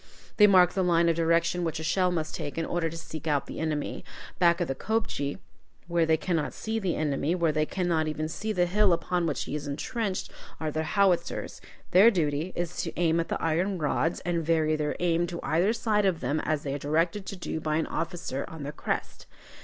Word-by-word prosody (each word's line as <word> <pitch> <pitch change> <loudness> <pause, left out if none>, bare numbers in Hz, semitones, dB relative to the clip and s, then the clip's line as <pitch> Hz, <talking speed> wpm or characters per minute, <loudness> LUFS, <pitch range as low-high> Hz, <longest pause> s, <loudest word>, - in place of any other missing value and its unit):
They 210 - +8
mark 180 -3 +6
the 190 - 0
line 170 -2 +3
of 165 - +2
direction 170 +1 +2
which 165 -1 -2
a - - -5
shell 180 +3 +2
must 160 -3 -2
take, 145 - -5
in 165 - 0
order 170 -2 -1
to 165 - -7
seek 160 -1 -7
out 145 -2 +1
the - - -7
enemy. 155 -2 -2 0.4
Back 170 -1 +4
of 175 - 0
the 135 - -1
kopje, 145 -7 -2 0.5
where 170 -2 +1
they 160 0 +4
cannot 160 -2 -1
see 220 0 -2
the 190 -5 -1
enemy, 150 +2 0
where 170 -3 +2
they 155 0 0
cannot 170 -4 0
even 155 0 -2
see 215 +7 -4
the 180 -4 +2
hill 195 +1 +3
upon 175 0 0
which 150 - -1
he - - -6
is 150 -1 -3
intrenched, 190 +7 -3 0.3
are 155 -1 -2
the 155 - -1
howitzers. 175 0 0 0.3
Their 195 +6 +8
duty 160 -3 0
is 175 0 -3
to 165 - -4
aim 165 -1 +3
at 165 - -1
the - - -2
iron 175 +4 0
rods, 160 +1 0
and 170 -2 -1
vary 160 -1 +2
their 150 -1 -1
aim 175 -1 +1
to 170 -1 -5
either 175 +7 +2
side 215 -3 +1
of 175 -4 0
them 145 +3 -1
as 155 -1 0
they 140 - -3
are 145 - -3
directed 165 +7 0
to - - -4
do 175 -3 -4
by 155 -1 -1
an 160 - +1
officer 165 -5 -3
on 160 -3 -8
the 145 - -4
crest. 150 - -4
165 Hz, 225 wpm, -28 LUFS, 155-180 Hz, 0.5 s, They